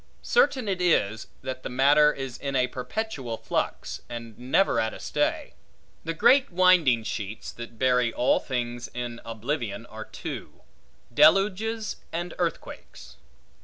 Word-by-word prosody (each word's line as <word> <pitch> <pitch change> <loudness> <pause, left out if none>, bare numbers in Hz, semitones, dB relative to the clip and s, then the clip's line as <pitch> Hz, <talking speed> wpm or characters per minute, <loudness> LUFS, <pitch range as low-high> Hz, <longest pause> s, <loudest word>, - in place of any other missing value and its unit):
Certain 270 - +2
it 190 -2 -1
is, 110 - +1 0.2
that 130 0 -5
the - - -5
matter 145 +4 +5
is 135 -4 -6
in 140 -1 -3
a 125 -1 +3
perpetual 125 - -4
flux, - - -3
and 115 -2 -7
never 130 +10 +2
at 110 0 -1
a - - -10
stay. - - -1 0.5
The 165 0 -2
great 270 +8 +4
winding 170 -10 +4
sheets, 105 0 -5
that 120 -1 -10
bury 125 -1 +2
all 125 - +2
things 120 -2 -3
in 120 -1 -5
oblivion, 115 -2 -4
are - - -9
two; - - -8 0.5
deluges 210 +5 +3
and 175 +1 -4
earthquakes. 160 - -5
130 Hz, 135 wpm, -26 LUFS, 120-175 Hz, 0.5 s, matter